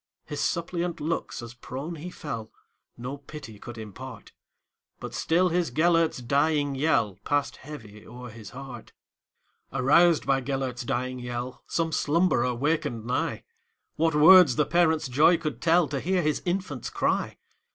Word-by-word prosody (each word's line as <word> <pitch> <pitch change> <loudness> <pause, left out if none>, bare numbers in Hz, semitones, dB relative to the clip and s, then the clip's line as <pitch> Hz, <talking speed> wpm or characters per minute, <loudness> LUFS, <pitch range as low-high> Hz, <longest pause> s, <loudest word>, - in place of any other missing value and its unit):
His 150 -1 -5
suppliant 170 0 -2
looks, 160 -5 -3
as 120 0 -9
prone 135 +6 -6
he 165 +4 -7
fell, 115 -11 -6 0.5
No 125 +4 -5
pity 140 -7 -10
could 120 +2 -9
impart; 110 +1 -9 0.7
But - - -7
still 180 +3 +2
his 175 -3 0
Gêlert's 165 0 +2
dying 145 +2 +1
yellPassed 135 - 0
heavy 110 -8 -11
o'er 125 -1 -9
his 110 -2 -10
heart. 135 +4 -10 0.8
Aroused 165 +5 +4
by 135 -1 +2
Gêlert's 130 -2 -3
dying 130 +1 -2
yell, 125 +1 -5
Some 165 -1 -1
slumberer 150 -7 +2
wakened 125 -4 -1
nigh:What 150 +5 -3
words 160 -2 +8
the 150 - +2
parent's 160 -3 +2
joy 150 +7 +5
could 155 -7 -5
tellTo 165 -4 +3
hear 185 0 +1
his 155 0 0
infant's 175 - -2
cry! - - -1
145 Hz, 135 wpm, -27 LUFS, 125-165 Hz, 0.8 s, words